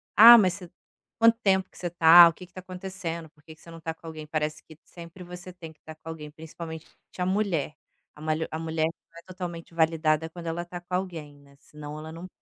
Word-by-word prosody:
"Ah, 235 +3 +11
mas 185 -5 +3
você 180 -2 -10 0.5
quanto 230 0 +5
tempo 190 -2 +2
que - - -19
você 175 - -4
tá, 170 0 +9
o - - -6
que 180 - -12
que - - -32
está 185 - -9
acontecendo, 180 -3 -6
por 150 - -28
que 160 - -12
que 155 - -22
você - - -15
não 165 - -10
está 160 0 -5
com 165 - -15
alguém?", 155 -1 -8
parece 155 0 -3
que 155 - -15
sempre 170 +1 -12
você 180 +1 -10
tem 165 -3 -10
que 155 - -39
estar 160 +1 -11
com 155 - -19
alguém 150 -2 -8
principalmente 160 +1 -9 0.3
a 180 - 0
mulher, 185 -7 -1 0.4
a - - -16
malha 155 +1 -1
a 160 - -3
mulher 160 -1 -1 0.4
totalmente 175 -2 -7
validada 160 -1 +1
quando 170 0 -9
ela 165 +1 -3
está 175 0 -9
com 180 +1 -5
alguém, 165 -6 -5
né, 140 0 -21
senão 150 0 -10
ela 155 +1 -9
não 165 +3 -9
165 Hz, 230 wpm, -26 LUFS, 155-180 Hz, 0.5 s, Ah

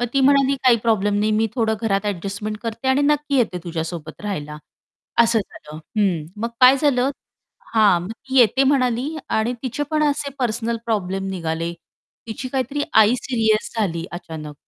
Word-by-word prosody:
मग 245 - +1
ती 275 - +2
म्हणाली, 275 0 +4
"काही 250 -2 +6
प्रॉब्लेम 210 -3 +1
नाही 215 +1 +1
मी 220 +1 +2
थोडं 225 -3 +1
घरात 200 -2 0
एडजस्टमेंट 205 +2 -3
करते 230 +2 -3
आणि 265 +2 +3
नक्की 295 -1 +1
येते 225 -8 +1
तुझ्यासोबत 165 -1 -5
राहायला." 150 -8 -4 0.7
असं 230 0 +3
झालं. 155 -5 -11 0.2
हं. 180 -7 +1 0.2
मग 230 - 0
काय 255 +2 +8
झालं? 270 -2 +2 0.6
हां. 205 -5 +5
मग 185 +5 -6 0.2
ती 265 - +2
"येते" 250 +3 +4
म्हणाली 265 +2 +1
आणि 220 +2 0
तिचे 260 +2 -3
पण 310 -1 +1
असे 285 0 -3
पर्सनल 235 -2 -1
प्रॉब्लेम 195 -3 -1
निघाले. 165 -2 -3 0.5
तिची 230 +3 -5
काहीतरी 270 +2 -2
आई 220 +2 +6
सीरियस 225 -4 0
झाली 170 -7 -1
अचानक 160 -4 -7
225 Hz, 165 wpm, -21 LUFS, 195-260 Hz, 0.7 s, काय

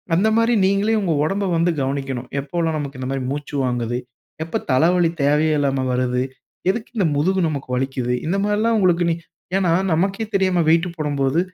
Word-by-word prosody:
அந்த 200 +5 +3
மாரி 230 +1 +3
நீங்களே 200 +3 +2
உங்க 170 -5 0
உடம்ப 195 +5 0
வந்து 170 +1 +2
கவனிக்கணும். 135 -2 -3
"எப்போல்லாம் 160 +2 -1
நமக்கு 140 -3 -5
இந்த 130 0 -4
மாரி 135 -1 -2
மூச்சு 145 0 -5
வாங்குது? 120 -1 -1 0.5
எப்ப 165 - -3
தலவலி 170 +5 +3
தேவையே 150 +2 +3
இல்லாம 135 -2 0
வருது? 125 0 0 0.5
எதுக்கு 225 +2 -6
இந்த 185 -5 +3
முதுகு 185 +6 +1
நமக்கு 140 -4 -5
வலிக்கிது?" 125 -1 -1
இந்த 195 +3 0
மாரில்லாம் 220 +2 +1
உங்களுக்கு 175 -2 +3
நீ - - 0 0.4
ஏன்னா, 180 -4 +2 0.2
நமக்கே 195 +6 0
தெரியாம 185 -3 +2
வெய்ட்டு 165 +2 +3
போடம்போது, 145 0 0
160 Hz, 165 wpm, -21 LUFS, 135-190 Hz, 0.5 s, அந்த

